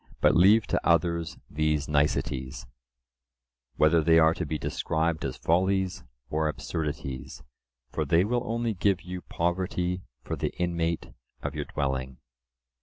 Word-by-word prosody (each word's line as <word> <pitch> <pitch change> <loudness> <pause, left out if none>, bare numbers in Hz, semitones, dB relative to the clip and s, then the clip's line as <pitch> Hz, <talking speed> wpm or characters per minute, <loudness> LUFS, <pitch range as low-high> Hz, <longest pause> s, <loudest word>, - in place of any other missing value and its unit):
But 75 +1 +4
leave 100 +5 +6
to - - 0
others 85 -1 +1
these 75 -1 0
niceties," 70 -2 0 1.1
whether 80 +2 +4
they 80 +1 +5
are 80 0 +6
to - - -4
be 80 - -2
described 80 +2 -1
as 70 -2 -3
follies 95 +2 +1 0.3
or 80 0 +1
absurdities: 70 -4 -4 0.5
"For 80 - -1
they 85 +4 +3
will 120 +3 0
only 115 0 -1
Give 95 -1 +1
you 90 0 -6
poverty 90 +1 -1 0.2
for - - -3
the - - -2
inmate 85 -1 -1 0.3
of - - -3
your - - -3
dwelling." 65 -2 -2
80 Hz, 135 wpm, -28 LUFS, 75-90 Hz, 1.1 s, leave